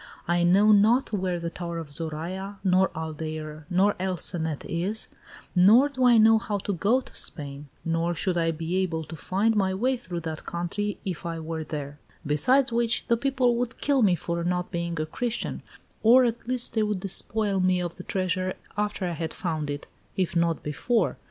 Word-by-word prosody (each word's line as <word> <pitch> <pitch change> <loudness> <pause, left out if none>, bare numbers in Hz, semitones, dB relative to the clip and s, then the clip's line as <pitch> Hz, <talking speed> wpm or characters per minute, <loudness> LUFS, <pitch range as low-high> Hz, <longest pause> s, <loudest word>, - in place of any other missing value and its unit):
I 175 0 +2
know 195 +5 +5
not 220 +4 +4
where 185 -3 -1
the 170 0 -4
Tower 170 -1 -5
of 160 -3 -6
Zoraya, 170 +6 -5
nor 190 0 +4
Aldeire, 155 -1 -5
nor 195 +3 +3
El 185 -1 -1
Cenet 160 -4 -2
is, 190 +6 -2 0.5
nor 220 +10 +6
do 260 -2 -2
I 240 -2 +7
know 220 0 +6
how 210 -2 -2
to 200 +1 -3
go 215 +8 +2
to - - -15
Spain, 145 -1 -3 0.2
nor 165 +1 0
should 180 +3 -1
I 165 -1 +2
be 165 +3 -2
able 170 -4 -1
to 160 +2 -9
find 200 +8 +1
my 190 -2 +1
way 255 +6 +1
through 175 -6 -6
that 160 -1 -5
country 195 +4 -3
if 185 -3 -4
I 170 -1 -3
were 160 0 -4
there; 145 -1 -6 0.3
besides 250 - +3
which, 230 0 +1
the 235 - +5
people 255 -1 +1
would 245 0 -2
kill 280 -2 +2
me 195 -5 +4
for 170 +1 -3
not 180 +1 -1
being 170 -1 -2
a 155 - 0
Christian, 235 +9 -3 0.4
or 245 +3 +7
at 235 0 -2
least 250 -2 0
they 220 - +2
would 210 -3 -1
despoil 200 +1 -1
me 185 0 +3
of 175 -1 -3
the 180 - -9
treasure 185 0 -1 0.2
after 210 -1 -1
I 175 - -1
had 160 -1 -4
found 155 -5 -2
it, 145 0 -4 0.3
if 185 -2 0
not 170 -2 +1
before. 225 +11 0
185 Hz, 195 wpm, -26 LUFS, 165-215 Hz, 0.5 s, I